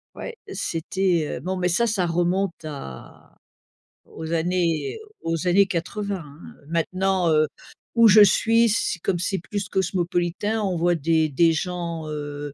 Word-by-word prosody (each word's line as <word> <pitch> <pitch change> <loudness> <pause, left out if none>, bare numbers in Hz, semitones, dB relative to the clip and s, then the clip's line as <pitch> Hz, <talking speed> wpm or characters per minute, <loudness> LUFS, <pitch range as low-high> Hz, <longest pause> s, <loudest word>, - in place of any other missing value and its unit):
Ouais, 480 - -7 0.2
c'était, 170 -1 -1
heu - - -6
bon 185 +2 -3
mais 180 0 +1
ça, 235 +7 +2
ça 200 -5 0
remonte 175 0 -1
à 135 - -10 0.7
aux 160 0 -8
années 170 - 0 0.2
aux 165 +1 -2
années 195 +2 +5
80, 190 +1 -3
hein, 145 +1 -15 0.2
heu, - - -22
maintenant, 185 +2 0
heu, 155 0 +4 0.5
où 230 -1 +6
je 210 +1 +8
suis, 230 +3 +4
c'est 190 -3 0
comme 175 0 -1
c'est 190 +2 -1
plus 195 +2 -4
cosmopolitain, 185 +3 -1
on 190 -4 -1
voit 175 +1 +2
des 160 0 +1
des 165 +4 +3
gens, 170 -1 -3
heu, 145 -1 -5
175 Hz, 155 wpm, -23 LUFS, 160-195 Hz, 0.7 s, je